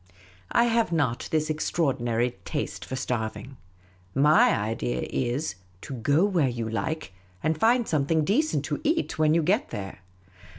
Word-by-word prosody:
I 235 - +4
have 230 -4 +2
not 140 -8 0
this 155 -1 +1
extraordinary 125 - 0
taste - - -4
for 130 - -5
starving; 125 +1 -4 0.6
7ny 150 0 +5
idea 65 - -2
is, 130 +5 -1 0.3
to 140 - -7
go 140 - +2
where 175 -9 +2
j'ou 115 -2 -4
like, 155 -1 -3 0.3
and 155 +1 +2
find 230 +8 +3
something 155 +1 +1
decent 210 - +1
to 145 -1 -3
eat 315 - 0
when 155 0 +4
you 165 - +3
get 205 - +1
there. 95 -2 -6
150 Hz, 145 wpm, -26 LUFS, 120-165 Hz, 0.6 s, 7ny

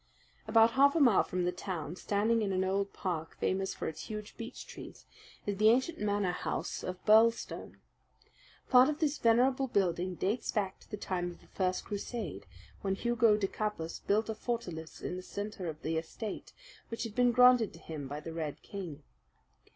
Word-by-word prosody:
About 225 0 +6
half 280 +4 +5
a - - +3
mile 245 -9 +6
from 180 0 -2
the 180 - +1
town, 180 -3 -5
standing 215 +4 +1
in 200 -2 0
an 185 0 +1
old 195 +1 0
park 165 -4 -4
famous 190 0 0
for - - -4
its 160 - -6
huge 210 -1 -7
beech 230 0 -7
trees, - - -11 0.4
is 205 -1 -2
the 215 +2 +6
ancient 260 +8 +2
Manor 205 -3 +1
House 180 - -3
of 185 0 -4
Birlstone. 225 +2 +3 0.9
Part 255 +2 +8
of 300 - -1
this 300 -2 0
venerable 255 +4 +3
building 185 -5 0
dates 205 +8 -1
back 195 -3 -1
to - - -20
the 210 - -5
time 180 -3 -2
of 175 - -11
the - - -19
first 185 -1 -1
crusade, 200 - -5 0.3
when 195 -1 0
Hugo 235 -1 +3
de 205 - 0
Capus 195 -5 -3
built 215 +2 +1
a 220 - -2
fortalice 185 -9 -5
in 180 - -3
the - - -5
centre 205 0 -5
of 155 -2 -5
the 160 0 -1
estate, 190 +6 -5 0.4
which 230 - -4
had 225 -3 -5
been 245 +1 +4
granted 250 -3 +6
to - - -12
him 155 -4 -6
by 145 +2 -5
the 160 +2 -7
Red 155 -3 -4
King. 180 -8 -7
205 Hz, 190 wpm, -32 LUFS, 180-230 Hz, 0.9 s, Part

